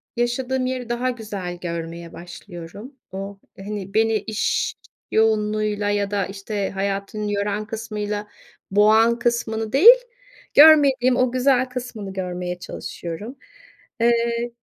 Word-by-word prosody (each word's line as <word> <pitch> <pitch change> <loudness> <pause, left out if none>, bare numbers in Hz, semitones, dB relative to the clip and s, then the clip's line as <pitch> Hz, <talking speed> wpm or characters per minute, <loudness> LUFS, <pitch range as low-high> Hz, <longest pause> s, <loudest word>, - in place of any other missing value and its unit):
yaşadığım 255 +2 -1
yeri 255 -2 -3
daha 240 +2 0
güzel 205 -7 -5
görmeye 170 -1 -6
başlıyorum. 175 - -10 0.2
O, 195 +1 -6 0.2
hani, 195 -1 -6
beni 225 0 +3
iş 215 +1 -1 0.4
yoğunluğuyla 215 -1 +1
ya 205 -1 0
da, 200 -2 0
işte, 195 +1 -4
hayatın 200 +2 -3
yoran 205 +1 -1
kısmıyla 210 -2 -4 0.4
boğan 220 +3 +4
kısmını 225 -2 -1
değil, 420 - +9 0.6
görmediğim 280 -5 +7
o 255 -1 +2
güzel 255 0 +3
kısmını 240 -6 -6
görmeye 180 -1 -4
çalışıyorum. 180 +5 -7 0.7
Eee, 235 0 +1
215 Hz, 110 wpm, -22 LUFS, 195-240 Hz, 0.7 s, değil